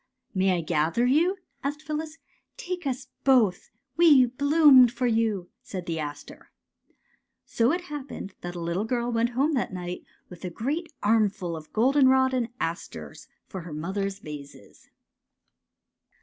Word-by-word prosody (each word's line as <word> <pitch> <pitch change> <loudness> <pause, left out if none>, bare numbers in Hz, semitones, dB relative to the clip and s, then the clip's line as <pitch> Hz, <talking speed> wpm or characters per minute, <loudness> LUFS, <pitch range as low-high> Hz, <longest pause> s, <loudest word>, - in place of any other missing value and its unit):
'' - - -48
May 190 -1 +3
I - - -1
gather 165 +8 +1
you? 330 +9 +3
" - - -45
asked 290 +2 -3
Phyllis. 310 +1 -4 0.2
'' - - -49
Take 355 -4 -3
us 260 0 -4
both. 240 -9 +3 0.3
We 305 -7 +7
bloomed 275 -1 +6
for 250 +1 -2
you," 220 -6 0
said 185 -3 -7
the 165 -2 -3
aster. 145 -1 -8 1.0
So 235 +3 +1
it 350 +2 -1
happened 290 - -7
that 175 0 -6
a - - -5
little 170 +4 -2
girl 240 +1 -1
went 235 +1 0
home 295 +4 +2
that 255 - -1
night 180 -1 -5 0.2
with 180 0 -13
a 180 - -3
great 300 - -3
armful 205 -5 +1
of 155 -1 -10
goldenrod 260 +2 +4
and 245 -2 0
asters 165 +2 -5 0.2
for 190 - -7
her 165 -2 -9
mother's 195 +5 -3
vases. 145 - -11
230 Hz, 155 wpm, -26 LUFS, 180-275 Hz, 1.0 s, We